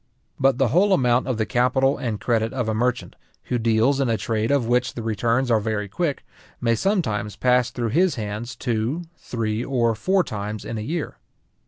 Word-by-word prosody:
But 135 -2 +3
the 135 -3 +2
whole 190 - +4
amount 125 -5 +2
of 130 -4 -1
the 110 - 0
capital 130 +5 +2
and 115 -6 -3
credit 115 -1 0
of 125 -4 -2
a 110 - 0
merchant, 125 +3 -1 0.3
who 125 - -2
deals 115 +4 +2
in 135 -3 +1
a 115 - +1
trade 110 0 -1
of 140 -4 +2
which 125 +2 +1
the 115 - -5
returns 115 +3 0
are 110 - +4
very 105 -1 -2
quick, 145 - -2 0.3
may 115 -1 +2
sometimes 115 - 0
pass 125 -1 +2
through 120 -1 -3
his 175 +9 +2
hands 110 +3 -5
two, 120 +7 -2
three, 115 -1 -3
or 120 -4 +1
four 185 - +1
times 105 - -5
in 115 - -4
a - - -3
year. 155 +8 -4
120 Hz, 195 wpm, -23 LUFS, 110-135 Hz, 0.3 s, whole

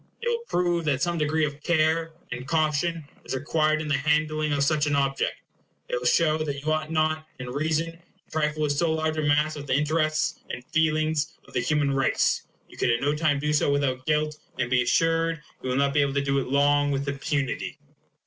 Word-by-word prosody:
It 475 - -2
will 470 0 0
prove 175 -2 +1
that 140 -4 +1
some 175 -1 0
degre 155 +1 +1
e - - +4
of 145 0 -6
care 160 0 +1 0.2
and 125 +1 -5
caution 155 +1 0 0.2
is - - -4
required 155 +3 +1
in - - -6
the 150 -2 +2
handling 155 +1 +1
such 150 +1 +2
an 145 - +1
object; 140 -1 0 0.5
it - - -1
will 125 - -1
show 155 +1 +3
that 145 -3 -2
you 155 +2 -2
ought 155 0 -2
not, 155 0 0
in 125 -1 -6
reason, 160 +4 0
to 170 +1 -25
trifle 155 -1 0
with 150 - +1
so 160 +3 +1
large 155 0 -1
a - - +1
mass 150 +1 +2
of 145 -1 -7
the 130 - +2
interests 155 +2 +1
and 125 - -6
feelings 155 +1 0
of - - -17
the - - +1
human 140 +2 +1
race. 135 -1 +1 0.2
You - - -16
could - - +1
at 115 0 +2
no 145 +2 +2
time 150 -1 +1
do 150 +1 -1
so 145 -1 +2
without 130 -2 0
guilt; 150 0 0 0.2
and 125 - -1
be 125 -1 +4
assured 165 +5 +2 0.2
you 130 - -4
will 125 - 0
not 140 0 +2
be 145 - +4
able 140 -1 0
to 140 - +1
do 140 0 +1
it 135 - -3
long 145 +1 +3
with 140 0 -1
impunity. 140 -1 -2
150 Hz, 220 wpm, -26 LUFS, 140-155 Hz, 0.5 s, e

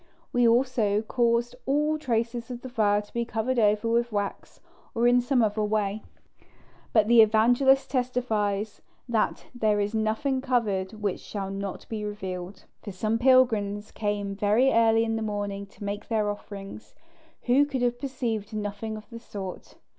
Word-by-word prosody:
We 245 -1 +4
also 230 -4 +2
caused 235 +1 +1
all 300 +3 +1
traces 235 -3 -2
of 245 -1 -6
the 260 - -7
fire 210 -4 +2
to 205 - -18
be 235 - 0
covered 235 +2 -1
over 210 +1 +2
with 235 +1 +1
wax 205 -1 -4 0.4
or 235 +1 +3
in 245 0 +5
some 245 -1 +2
other 215 0 0
way. 210 0 -1 0.9
But 215 -2 +4
the 235 0 +7
Evangelist 245 +5 +4
testifies 220 -5 -1 0.3
that 230 -3 0
"there 215 -4 +1
is 205 +1 -1
nothing 225 +5 0
covered 215 -8 0
which 210 -3 -3
shall 195 -2 -5
not 195 -1 -5
be 215 -2 -4
revealed": 190 -2 -6 0.2
for 205 - -7
some 215 +4 -1
pilgrims 220 -5 +3
came 205 -2 -2
very 210 +6 +3
early 225 0 +4
in 225 0 -1
the - - -3
morning 205 -2 -3
to 200 - -13
make 205 +1 -4
their 215 -2 0
offerings, 200 0 -9 0.5
who 260 +3 +4
could 265 -3 -2
have 245 0 0
perceived 235 -5 -3
nothing 210 +1 -4
of 215 - -12
the 230 - -7
sort. 195 -5 -8
220 Hz, 160 wpm, -26 LUFS, 205-245 Hz, 0.9 s, the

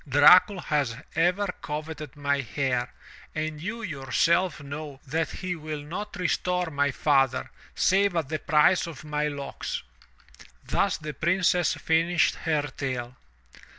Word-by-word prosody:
Dracul 180 +8 +7
has 140 -6 0 0.2
ever 180 +5 +2 0.2
coveted 150 -1 -6
my 140 -1 0
hair 125 -1 -1 0.4
and 155 -1 -3
you 230 +6 -4
yourself 170 - +1
know 145 0 -7
that 160 +4 -1
he 185 -1 -4
will 155 -2 -6
not 200 +8 -6
restore 180 -1 0
my 145 -1 +1
father, 135 -1 +1 0.2
save 195 0 +3
at 160 -4 0
the 155 -1 -2
price 155 +5 +3
of 155 -5 -9
my 150 0 -1
locks/' 140 -2 -5 0.8
Thus - - +1
the 150 -1 -6
Princess 175 +3 +2
finished 165 +1 +2
her 155 -3 -1
tale. 125 -2 -4
155 Hz, 130 wpm, -26 LUFS, 140-175 Hz, 0.8 s, Dracul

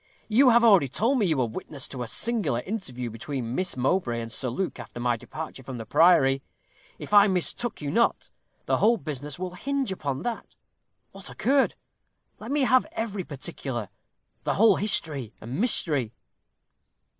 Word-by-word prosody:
"You 250 +5 +5
have 235 0 +5
already 200 -11 +6
told 240 - +1
me 205 - +2
you 160 -4 +1
were 130 - +2
witness 130 +5 -6
to 130 - -6
a 120 - -3
singular 190 - 0
interview 125 - -4
between 120 +1 -5
Miss 185 -1 0
Mowbray 125 -2 0
and 115 0 -6
Sir 125 - +1
Luke 180 +10 -3
after - - -9
my 120 0 +1
departure 155 +4 -8
from 130 -1 -7
the 115 - -7
priory. 135 -2 +4 0.6
If - - -8
I 205 0 +8
mistook 190 +2 -1
you 140 - -2
not, 235 +8 +1 0.3
the - - +1
whole 230 +2 +4
business 150 - -5
will 180 0 -5
hinge 275 +4 -2
upon 140 -7 -3
that. 240 -2 -5 0.6
What 195 -1 -7
occurred? 270 +4 +1 0.6
Let 220 - -8
me 290 +1 +1
have 255 0 +3
every 210 -4 -3
particular. 135 - -5 0.5
The - - 0
whole 215 -2 +5
history 145 - 0
and 120 - -4
mystery." 145 - +1
165 Hz, 170 wpm, -26 LUFS, 130-215 Hz, 0.6 s, I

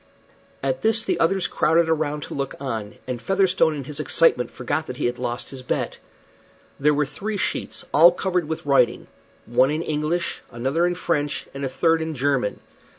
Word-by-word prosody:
At 130 -1 -1
this 220 0 +3
the 180 -3 -1
others 180 +2 +2
crowded 165 +1 +2
around 150 -2 0
to - - -7
look 140 -1 -3
on, 110 -6 -4
and 125 -2 -4
Featherstone 185 -2 +2
in 140 - -5
his 145 +3 -8
excitement 140 -5 +3
forgot 145 +5 -3
that 125 - -6
he - - -1
had 120 0 -1
lost 120 0 -3
his 135 -2 -7
bet. 125 - -2 0.8
There 150 +2 +4
were 150 0 +2
three 200 +10 -4
sheets, - - -3
all 165 +4 +8
covered 180 -2 -1
with 160 -1 -4
writing 130 -4 +3 0.4
one 130 +3 +3
in 155 +2 -1
English, 155 +3 -1
another 135 +9 0
in 175 - -1
French, 150 -5 -1
and 140 0 -6
a 135 - -1
third 165 +4 +2
in 160 -1 -3
German. 135 -5 0
150 Hz, 185 wpm, -23 LUFS, 130-170 Hz, 0.8 s, all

